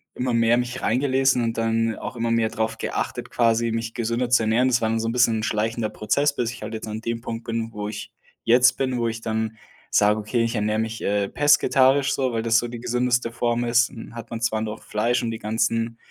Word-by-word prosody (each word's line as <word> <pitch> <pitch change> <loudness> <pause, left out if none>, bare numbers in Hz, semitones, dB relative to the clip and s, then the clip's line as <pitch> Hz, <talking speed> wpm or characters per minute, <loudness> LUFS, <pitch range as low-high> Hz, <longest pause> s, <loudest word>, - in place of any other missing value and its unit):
immer 125 -1 -1
mehr 115 0 +3
mich 125 +1 -3
reingelesen 130 0 +2
und 115 0 -2
dann 115 0 0
auch - - -6
immer 115 0 -1
mehr 115 -1 +2
drauf 110 0 -2
geachtet, - - -4
quasi, 115 -1 +2
mich 115 0 -3
gesünder 120 +1 -1
zu 120 -2 +4
ernähren. 115 +4 +2
Das 125 -1 +3
war 110 - 0
dann 115 0 0
so 115 - -2
'n - - 0
bisschen 115 -2 +2
schleichender 110 0 -1
Prozess, 140 +8 0
bis 120 -1 -1
ich 125 - -11
halt 110 +1 -5
jetzt 110 - -6
an 110 +1 -5
dem 115 0 -3
Punkt 115 0 -6
bin, 115 0 -3
wo 105 -1 -4
ich 105 0 -7 0.3
jetzt 125 +2 +5
bin, 130 -2 -1
wo 115 - 0
ich 115 0 -4
dann 110 0 -2 0.3
sage: 105 +1 +3
„Okay, 110 +3 -1
ich 115 +1 -1
ernähre 105 0 0
mich, 110 0 -3
äh, 100 -1 0
pesketarisch.“, 140 -2 +3
so, 130 -2 0
weil 115 -1 -2
das 115 0 +4
so 120 - -3
die 120 0 -7
gesündeste 125 0 0
Form 120 0 0
ist, 120 +2 +3
hm, 115 -3 -10
hat 115 -1 -8
man 115 - -5
zwar 110 -1 0
noch 110 0 -5
Fleisch 120 +3 0
und 115 - -1
die 110 - -5
ganzen, 115 +1 -1
115 Hz, 235 wpm, -23 LUFS, 110-120 Hz, 0.3 s, jetzt